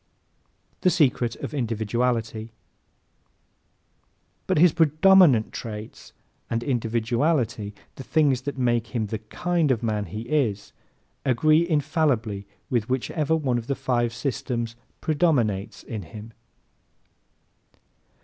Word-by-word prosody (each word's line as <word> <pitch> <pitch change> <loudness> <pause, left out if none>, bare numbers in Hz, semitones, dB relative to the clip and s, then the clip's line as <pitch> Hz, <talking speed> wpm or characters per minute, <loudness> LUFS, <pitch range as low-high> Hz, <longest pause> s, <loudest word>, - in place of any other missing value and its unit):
The 185 - +3
Secret 130 -9 +2
of - - -7
Individuality 115 -2 -1
¶ - - -14 2.0
But - - +1
his 165 0 +6
PREDOMINANT 160 - +5
traits 110 -1 -8 0.4
and 115 0 -1
INDIVIDUALITY 115 -2 0 0.2
the 135 - -7
things 140 -4 +2
that 140 +1 -5
make 120 -1 0
him 110 -2 0
the 105 +1 -4
KIND 170 +8 -1
of 120 -3 +1
man 105 -2 -1
he 105 +1 -6
is 120 -6 -1 0.5
agree 155 +6 +3
infallibly 140 - 0 0.2
with 120 -2 -1
whichever 145 +5 0
one 130 -6 0
of 115 - -10
the 140 - 0
five 120 -3 0
systems 120 -1 -3 0.3
PREDOMINATES 130 - 0
in 110 -3 -5
him. 105 +6 -10
120 Hz, 110 wpm, -25 LUFS, 110-150 Hz, 2.0 s, his